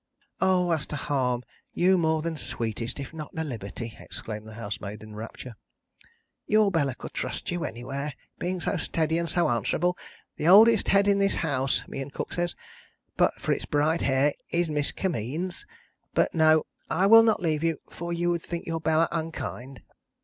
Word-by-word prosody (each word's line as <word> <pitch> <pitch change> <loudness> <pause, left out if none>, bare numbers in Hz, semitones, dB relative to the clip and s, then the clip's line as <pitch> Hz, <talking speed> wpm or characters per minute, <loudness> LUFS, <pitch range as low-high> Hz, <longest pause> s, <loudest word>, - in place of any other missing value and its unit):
"O! 185 -2 +3
As 160 -3 0
to - - -5
harm, 130 -3 0 0.3
you 185 +2 +4
more 160 -3 +1
than 165 -1 -2
sweetest, 115 -3 -4
if 140 +3 -6
not 155 -2 -6
a 160 - 0
liberty," 115 -4 -6
exclaimed 110 -1 -7
the 110 - -10
housemaid, 105 -1 -6
in 110 0 -11
a - - -10
rapture, 115 +3 -8 0.9
"your 215 -1 +4
Bella 145 -7 +1
could - - -9
trust - - -3
you 175 -1 -2
anywhere, 135 +5 -4 0.2
being 180 +1 -2
so - - -1
steady, 160 0 0
and 170 -1 -2
so 175 - +2
answerable. 120 - +1 0.4
The 155 - -1
oldest 220 +4 +7
head 200 +1 +4
in 200 0 +4
this 195 0 +2
house 135 -5 0
(me 135 - -5
and 135 +1 -6
Cook - - -5
says), 175 -1 -1 0.6
but - - +2
for - - -1
its - - 0
bright 150 +3 +2
hair, 135 +2 +3 0.2
is 170 -1 +1
Miss 150 -1 0
Kimmeens. 170 - -3 0.5
But - - +2
no, 155 -1 +5 0.2
I 185 +4 +2
will 225 +3 +9
not 225 -1 +3
leave 160 -3 0
you; 165 -2 +1
for 170 +1 -5
you 175 0 +1
would 170 -1 -1
think 170 0 -5
your 165 -1 -3
Bella 160 +1 +3
unkind." 155 -5 -5
160 Hz, 185 wpm, -27 LUFS, 130-175 Hz, 0.9 s, will